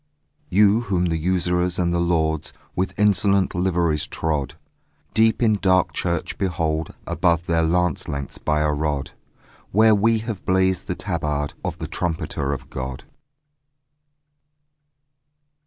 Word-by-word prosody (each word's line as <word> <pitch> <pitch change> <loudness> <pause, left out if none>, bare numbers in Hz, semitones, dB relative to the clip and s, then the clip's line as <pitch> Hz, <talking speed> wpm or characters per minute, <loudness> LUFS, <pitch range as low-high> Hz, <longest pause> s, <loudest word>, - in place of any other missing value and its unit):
You 105 +3 +4
whom 90 -2 +2
the 85 -2 0
usurers 90 +1 0
and 85 -1 +1
the 85 - +1
lords 80 -3 0 0.2
With 95 +1 -2
insolent 100 -1 +3
liveries 85 -4 0
trod, 75 -2 -2 0.6
Deep 110 +2 +3
in 110 -2 +3
dark 95 -2 +2
church 85 -2 -2
behold, 80 -4 -1
above 85 0 +1
Their 85 -1 +1
lance 85 0 +1
lengths 70 -1 -5
by 75 0 0
a 75 -1 +1
rod, 75 -2 -2 0.6
Where 110 +2 +5
we 110 +2 +3
have 110 -3 -5
blazed 95 0 +1
the - - -2
tabard 75 -1 -2
Of - - -3
the - - -5
trumpeter 80 -5 -2
of 70 -4 -6
God. 65 0 -5
85 Hz, 130 wpm, -22 LUFS, 80-95 Hz, 0.6 s, Where